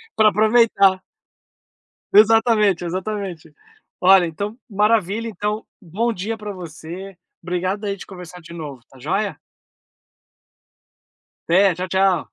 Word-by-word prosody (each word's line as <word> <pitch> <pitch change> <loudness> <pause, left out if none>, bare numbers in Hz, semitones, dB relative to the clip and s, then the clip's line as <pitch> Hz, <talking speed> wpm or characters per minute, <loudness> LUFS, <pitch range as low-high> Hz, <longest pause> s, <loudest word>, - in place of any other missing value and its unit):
pra 215 -1 +5
aproveitar. 215 -3 +3 1.1
Exatamente, 215 -3 +4
exatamente. 185 -3 -5 0.5
Olha, 185 -1 +6
então, 205 +8 -5
maravilha, 210 +1 +1
então, 210 0 -3 0.2
bom 215 +7 -2
dia 215 +4 -4
para 210 -1 -7
você. 175 +2 -9 0.3
Obrigado 185 +4 -2
aí, 200 -1 -2
de - - -11
conversar 180 -2 -11
de 170 +1 -13
novo, 150 -6 -8
tá 135 - -18
joia. 195 +10 -2 2.1
Até, 185 +1 +4
tchau, 180 +2 -5
tchau. 190 -3 +2
195 Hz, 110 wpm, -21 LUFS, 175-210 Hz, 2.1 s, Olha